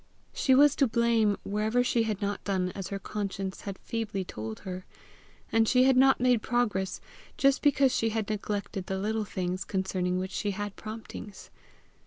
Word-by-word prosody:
She 265 Hz, -, +3 dB
was 290 Hz, +1 st, +6 dB
to 275 Hz, -, +4 dB
blame 225 Hz, -2 st, +2 dB
wherever 215 Hz, +4 st, +1 dB
she 240 Hz, -1 st, +2 dB
had 210 Hz, -1 st, -2 dB
not 200 Hz, 0 st, -2 dB
done 185 Hz, -2 st, 0 dB
as 195 Hz, -1 st, -6 dB
her 200 Hz, -, -3 dB
conscience 195 Hz, -1 st, -4 dB
had 200 Hz, -2 st, -6 dB
feebly 215 Hz, -5 st, -3 dB
told 110 Hz, -6 st, -6 dB
her; 185 Hz, -1 st, -6 dB, 0.7 s
and 225 Hz, 0 st, +3 dB
she 250 Hz, +2 st, +5 dB
had 265 Hz, 0 st, +5 dB
not 265 Hz, +1 st, +5 dB
made 245 Hz, -2 st, +3 dB
progress 210 Hz, -6 st, 0 dB, 0.4 s
just 275 Hz, 0 st, +3 dB
because 275 Hz, -3 st, +3 dB
she 225 Hz, -, +1 dB
had 220 Hz, -2 st, -2 dB
neglected 205 Hz, -2 st, -3 dB
the 190 Hz, -, -2 dB
little 215 Hz, +2 st, -1 dB
things 185 Hz, -2 st, -3 dB
concerning 185 Hz, -1 st, -1 dB
which 185 Hz, +1 st, -3 dB
she 205 Hz, 0 st, -2 dB
had 205 Hz, -1 st, -4 dB
promptings. 215 Hz, -2 st, -9 dB
210 Hz, 175 wpm, -29 LUFS, 190-235 Hz, 0.7 s, was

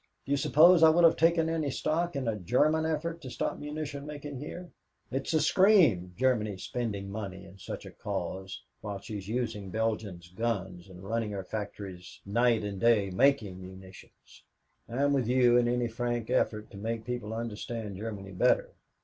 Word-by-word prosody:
Do -, -, -6 dB
you 140 Hz, -, +3 dB
suppose 165 Hz, +5 st, +6 dB
I 160 Hz, -, +9 dB
would 170 Hz, +2 st, +4 dB
have 165 Hz, -, +7 dB
taken 165 Hz, 0 st, +3 dB
any 160 Hz, -3 st, -1 dB
stock 160 Hz, +5 st, -1 dB
in 135 Hz, -3 st, -2 dB
a 115 Hz, -, 0 dB
German 150 Hz, -, +2 dB
effort 165 Hz, +2 st, -2 dB
to 130 Hz, -, -7 dB
stop -, -, -3 dB
munition 150 Hz, -1 st, -5 dB
making 145 Hz, -2 st, -7 dB
here? 175 Hz, +5 st, -8 dB, 0.4 s
It's 135 Hz, +1 st, -2 dB
a 160 Hz, -, +3 dB
scream 155 Hz, -, +4 dB
Germany 110 Hz, -6 st, +1 dB
spending 100 Hz, -2 st, -4 dB
money 100 Hz, -3 st, -6 dB
in 95 Hz, +2 st, -15 dB
such -, -, -7 dB
a -, -, -9 dB
cause 95 Hz, 0 st, -5 dB, 0.2 s
while 105 Hz, -2 st, -4 dB
she's 100 Hz, -1 st, -7 dB
using 110 Hz, -4 st, -3 dB
Belgium's 105 Hz, -5 st, -2 dB
guns 95 Hz, -3 st, -3 dB
and 90 Hz, 0 st, -12 dB
running 110 Hz, +2 st, -1 dB
her 95 Hz, -1 st, -4 dB
factories 100 Hz, -3 st, -7 dB
night 115 Hz, +2 st, +2 dB
and 100 Hz, -2 st, -4 dB
day 110 Hz, -4 st, +3 dB
making 105 Hz, -4 st, +2 dB
munitions! 95 Hz, 0 st, -13 dB, 0.5 s
I'm 140 Hz, +4 st, +1 dB
with 130 Hz, -5 st, +1 dB
you 125 Hz, -1 st, +4 dB
in 120 Hz, -1 st, +3 dB
any 120 Hz, 0 st, +1 dB
frank 120 Hz, 0 st, -3 dB
effort 105 Hz, -1 st, 0 dB
to -, -, -10 dB
make 115 Hz, +2 st, -3 dB
people 120 Hz, -3 st, -4 dB
understand 115 Hz, -2 st, -5 dB
Germany 100 Hz, -2 st, -6 dB
better. 95 Hz, -, +2 dB
115 Hz, 175 wpm, -29 LUFS, 100-140 Hz, 0.5 s, I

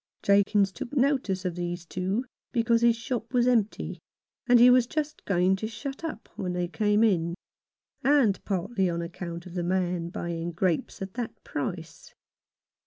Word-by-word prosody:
Jakins 200 Hz, 0 st, +4 dB
took 195 Hz, +8 st, -7 dB
notice 250 Hz, -9 st, +1 dB
of 180 Hz, -, -1 dB
these 175 Hz, 0 st, -4 dB
two 190 Hz, +8 st, -2 dB, 0.3 s
because 230 Hz, -1 st, +2 dB
his 235 Hz, -1 st, +5 dB
shop 230 Hz, -1 st, -4 dB
was 245 Hz, -1 st, +4 dB
empty, 230 Hz, -4 st, 0 dB, 0.5 s
and 245 Hz, -1 st, +6 dB
he 245 Hz, +1 st, +8 dB
was 250 Hz, -1 st, +5 dB
just 305 Hz, +2 st, -3 dB
going 185 Hz, 0 st, +3 dB
to 220 Hz, -, -3 dB
shut 270 Hz, +7 st, -7 dB
up 310 Hz, -9 st, -5 dB
when 180 Hz, -2 st, -3 dB
they 180 Hz, 0 st, -1 dB
came 210 Hz, +3 st, +2 dB
in, 170 Hz, -6 st, +2 dB, 0.7 s
and 270 Hz, -8 st, +3 dB
partly 190 Hz, 0 st, 0 dB
on 170 Hz, 0 st, -2 dB
account 170 Hz, 0 st, -6 dB
of 180 Hz, -, -10 dB
the 180 Hz, -, -2 dB
man 175 Hz, -1 st, -1 dB
buying 170 Hz, -1 st, -4 dB
grapes 175 Hz, +1 st, -1 dB
at 190 Hz, 0 st, -7 dB
that 240 Hz, -2 st, -5 dB
price. 160 Hz, +1 st, -5 dB
195 Hz, 165 wpm, -27 LUFS, 175-235 Hz, 0.7 s, he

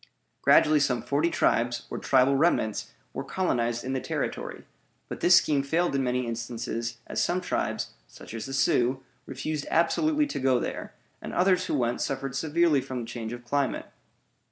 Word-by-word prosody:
Gradually 150 Hz, 0 st, +5 dB
some 130 Hz, -4 st, +1 dB
forty 145 Hz, +4 st, +1 dB
tribes, 120 Hz, -6 st, +1 dB
or -, -, -3 dB
tribal 135 Hz, +1 st, +3 dB
remnants, 135 Hz, -8 st, +1 dB, 0.2 s
were -, -, -4 dB
colonized 120 Hz, -10 st, -1 dB
in 130 Hz, -, -3 dB
the 130 Hz, -, -1 dB
Territory; -, -, -4 dB, 0.4 s
but -, -, -6 dB
this 175 Hz, 0 st, +6 dB
scheme 145 Hz, -5 st, +4 dB
failed 165 Hz, +5 st, 0 dB
in 135 Hz, -1 st, +1 dB
many 125 Hz, 0 st, 0 dB
instances, 120 Hz, 0 st, -4 dB
as -, -, -1 dB
some 180 Hz, +1 st, +1 dB
tribes 180 Hz, -, -2 dB
(such -, -, -12 dB
as 115 Hz, +2 st, -5 dB
the 135 Hz, -, -6 dB
Sioux) 130 Hz, 0 st, +2 dB, 0.2 s
refused 155 Hz, -2 st, -4 dB
absolutely 300 Hz, -, +2 dB
to 285 Hz, -, -4 dB
go 130 Hz, -2 st, +3 dB
there, -, -, -5 dB, 0.3 s
and -, -, -7 dB
others 185 Hz, 0 st, +3 dB
who -, -, 0 dB
went 120 Hz, -3 st, 0 dB
suffered 135 Hz, -1 st, -3 dB
severely 155 Hz, 0 st, +2 dB
from 130 Hz, -1 st, -5 dB
the -, -, -5 dB
change 115 Hz, -1 st, -6 dB
of 120 Hz, 0 st, -8 dB
climate. 140 Hz, +2 st, -1 dB
135 Hz, 175 wpm, -27 LUFS, 120-160 Hz, 0.4 s, this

